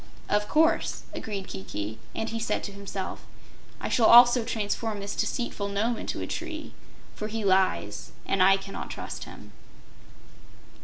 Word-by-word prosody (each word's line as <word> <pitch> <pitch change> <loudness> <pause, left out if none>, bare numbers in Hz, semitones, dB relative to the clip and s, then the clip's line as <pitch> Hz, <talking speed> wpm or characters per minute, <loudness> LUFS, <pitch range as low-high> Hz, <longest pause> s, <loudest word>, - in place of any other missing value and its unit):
"Of 210 0 +2
course," 320 +2 +2
agreed 200 -3 -5
Kiki, 100 +3 -5 0.2
and 225 - -2
he 230 - -3
said 225 - -1
to 200 - -4
himself: 200 -1 -6 0.6
"I - - -3
shall 225 -3 +4
also 240 0 +8
transform 220 -1 -2
this 200 +1 -4
deceitful 225 -4 -2
Nome 215 +4 0
into - - -4
a - - -2
tree, 325 -2 -5 0.4
for 215 - -4
he 220 -1 -3
lies 185 - +1
and 195 - +1
I 195 +1 +7
cannot 195 0 -7
trust - - -6
him." - - -12
205 Hz, 150 wpm, -27 LUFS, 195-230 Hz, 0.6 s, also